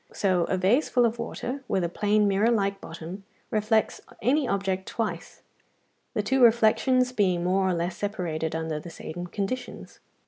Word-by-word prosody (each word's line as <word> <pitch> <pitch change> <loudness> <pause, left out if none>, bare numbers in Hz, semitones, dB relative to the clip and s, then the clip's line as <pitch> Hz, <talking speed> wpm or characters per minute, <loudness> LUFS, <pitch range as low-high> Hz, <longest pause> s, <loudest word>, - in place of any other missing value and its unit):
So 185 -4 +1
a 190 - -1
vase 205 +11 +2
full 245 -2 +3
of 230 0 -1
water, 250 +3 -4
with 190 - 0
a - - +1
plane 210 +4 +2
mirror 200 +3 +3
like 200 -4 0
bottom, 170 +4 -8 0.3
reflects 220 0 +1 0.2
any 270 +4 +2
object 190 -3 -1
twice, 205 -7 -4 0.7
the 210 - 0
two 265 +5 +1
reflections 240 +2 +4
being 185 -7 +1
more 190 +1 +2
or - - +1
less 170 +1 -2
separated 170 -6 -3
under 160 -1 -2
the 170 - -9
same 175 +1 -7
conditions. 245 +5 -5
200 Hz, 165 wpm, -26 LUFS, 180-230 Hz, 0.7 s, reflections